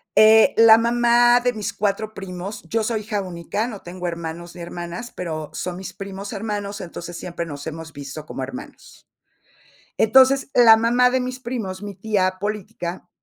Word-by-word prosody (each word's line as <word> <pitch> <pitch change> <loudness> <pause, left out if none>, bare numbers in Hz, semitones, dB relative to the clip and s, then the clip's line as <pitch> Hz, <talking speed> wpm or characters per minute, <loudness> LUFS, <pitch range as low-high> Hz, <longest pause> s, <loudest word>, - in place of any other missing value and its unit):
Eh, 220 0 +7
la 225 0 +9
mamá 240 +1 +4
de 245 0 +2
mis 210 -1 -4
4 210 +2 -1
primos 195 +1 -7
yo 225 0 0
soy 220 0 -1
hija 210 -1 -2
única, 185 +5 -3
no 210 -5 -8
tengo 180 0 -6
hermanos 170 0 -6
ni 175 - -9
hermanas, 175 +6 -6
pero 155 -4 -4
son 180 -1 -4
mis 190 - -7
primos 195 0 -7
hermanos. 205 -1 -4
Entonces 175 -1 -7
siempre 170 -1 -5
nos 145 -2 -7
hemos 160 0 -7
visto 145 +1 -8
como 135 - -5
hermanos. 255 - -10 0.9
Entonces, 265 +5 +5
la 230 -2 +8
mamá 240 +2 +3
de 260 - +1
mis 255 0 -4
primos, 220 -7 -5
mi 205 -2 -7
tía 190 -2 0
política, 200 -4 -5
200 Hz, 170 wpm, -22 LUFS, 175-225 Hz, 0.9 s, la